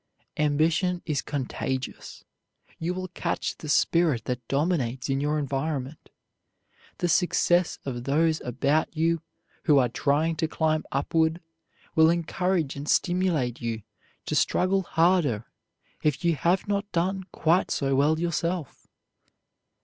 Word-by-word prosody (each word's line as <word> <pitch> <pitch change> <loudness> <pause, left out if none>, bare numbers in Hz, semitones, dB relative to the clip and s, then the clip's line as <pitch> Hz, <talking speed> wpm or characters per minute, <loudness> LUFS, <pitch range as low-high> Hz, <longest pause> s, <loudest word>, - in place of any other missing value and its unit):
Ambition 160 +4 +1
is 150 -4 -1
contagious. 130 -2 -4 0.5
You 175 +2 -2
will 185 0 -4
catch 170 - -2
the 155 - -7
spirit 150 -6 +2
that 125 -2 -4
dominates 135 -5 0
in 135 0 0
your 150 +1 0
environment. 140 0 -3 0.9
The 175 - 0
success 175 0 +2
of 120 -3 -4
those 155 +3 +2
about 145 +6 0
you 165 +1 +1 0.4
who 150 -3 +5
are 125 -3 +4
trying 155 +6 +1
to 160 0 0
climb 155 -1 0
upward 160 +4 +1 0.5
will 160 0 +6
encourage 170 -2 0
and 140 +1 -6
stimulate 175 -9 +1
you 115 -2 -3 0.4
to - - -3
struggle 190 +2 +2
harder 165 - +2 0.6
if 150 +3 0
you 170 -1 +3
have 175 +7 +1
not 205 0 -1
done 185 +2 -1
quite 170 +4 +2
so 135 -1 0
well 150 +4 +3
yourself. 170 -2 -2
155 Hz, 125 wpm, -26 LUFS, 140-175 Hz, 0.9 s, will